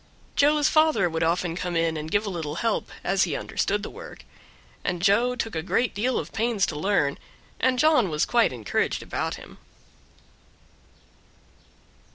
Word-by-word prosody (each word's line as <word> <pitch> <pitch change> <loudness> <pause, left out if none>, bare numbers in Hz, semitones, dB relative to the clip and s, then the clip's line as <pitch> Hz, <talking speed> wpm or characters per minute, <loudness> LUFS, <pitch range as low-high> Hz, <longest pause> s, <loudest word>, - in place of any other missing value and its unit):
Joe's 295 0 +4
father 310 - +3
would 160 -1 -3
often 170 +1 0
come 180 -1 -3
in 165 -1 +1
and 155 0 -5
give 205 +5 +1
a - - -2
little 160 -4 -4
help, 225 +5 -1
as 195 +1 +2
he 160 -5 -3
understood 205 +1 -1
the - - -5
work; - - -11 0.6
and 180 -1 -1
Joe 215 +7 +3
took 225 -2 -3
a 160 - -1
great 230 +8 0
deal 245 +6 0
of - - -5
pains 225 -3 +1
to 155 - -5
learn, 150 -4 0 0.4
and 255 -1 +2
John 280 - +4
was 150 -1 +1
quite 235 -2 +3
encouraged 115 -5 -1
about - - -3
him. - - -13
195 Hz, 165 wpm, -25 LUFS, 165-240 Hz, 0.6 s, Joe's